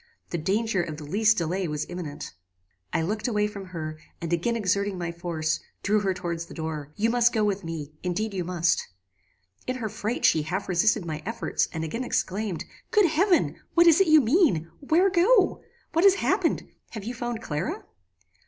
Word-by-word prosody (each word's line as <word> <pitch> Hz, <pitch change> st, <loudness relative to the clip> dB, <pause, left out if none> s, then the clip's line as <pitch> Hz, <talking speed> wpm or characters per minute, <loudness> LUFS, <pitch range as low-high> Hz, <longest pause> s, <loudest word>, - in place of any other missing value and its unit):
The 170 Hz, -, -1 dB
danger 200 Hz, +3 st, +1 dB
of 155 Hz, -3 st, -5 dB
the 155 Hz, -, -8 dB
least 215 Hz, +8 st, +3 dB
delay 180 Hz, +2 st, -1 dB
was 150 Hz, -1 st, -2 dB
imminent. 170 Hz, -, -6 dB, 0.6 s
"I 165 Hz, +1 st, 0 dB
looked 210 Hz, +7 st, -2 dB
away 210 Hz, -3 st, +1 dB
from 205 Hz, -2 st, -6 dB
her, 155 Hz, -4 st, -6 dB, 0.2 s
and 170 Hz, 0 st, -3 dB
again 175 Hz, +8 st, +1 dB
exerting 200 Hz, -2 st, 0 dB
my 170 Hz, -1 st, -3 dB
force, 165 Hz, -2 st, -2 dB, 0.2 s
drew 210 Hz, +1 st, +3 dB
her 195 Hz, -2 st, 0 dB
towards 170 Hz, -2 st, -4 dB
the -, -, -11 dB
door 155 Hz, -3 st, -5 dB
'You 225 Hz, +2 st, +1 dB
must 240 Hz, 0 st, +4 dB
go 220 Hz, -2 st, +1 dB
with 205 Hz, -1 st, 0 dB
me 155 Hz, -3 st, -6 dB
indeed 200 Hz, +4 st, -2 dB
you 185 Hz, -2 st, -2 dB
must.' 170 Hz, -1 st, +1 dB, 0.8 s
"In 255 Hz, -, -1 dB
her 230 Hz, -4 st, -3 dB
fright 215 Hz, +4 st, -2 dB
she 160 Hz, -, +5 dB
half 180 Hz, +6 st, -3 dB
resisted 190 Hz, +2 st, +2 dB
my 155 Hz, -2 st, -4 dB
efforts, 225 Hz, +3 st, -1 dB
and 160 Hz, -1 st, -4 dB
again 230 Hz, +11 st, -3 dB
exclaimed, 200 Hz, -5 st, -2 dB, 0.2 s
'Good 420 Hz, -3 st, +4 dB
heaven! 350 Hz, +3 st, +2 dB, 0.2 s
what 340 Hz, 0 st, +6 dB
is 335 Hz, +2 st, +6 dB
it 385 Hz, -, +4 dB
you 310 Hz, -1 st, +7 dB
mean? 225 Hz, -, +2 dB
Where 345 Hz, +7 st, +3 dB
go? 390 Hz, +3 st, +4 dB, 0.3 s
What 330 Hz, +2 st, +3 dB
has 395 Hz, -1 st, +7 dB
happened? -, -, 0 dB, 0.3 s
Have 215 Hz, -4 st, -6 dB
you 235 Hz, +4 st, -4 dB
found 240 Hz, -1 st, -4 dB
Clara?" 175 Hz, -, -3 dB
195 Hz, 190 wpm, -26 LUFS, 170-235 Hz, 0.8 s, you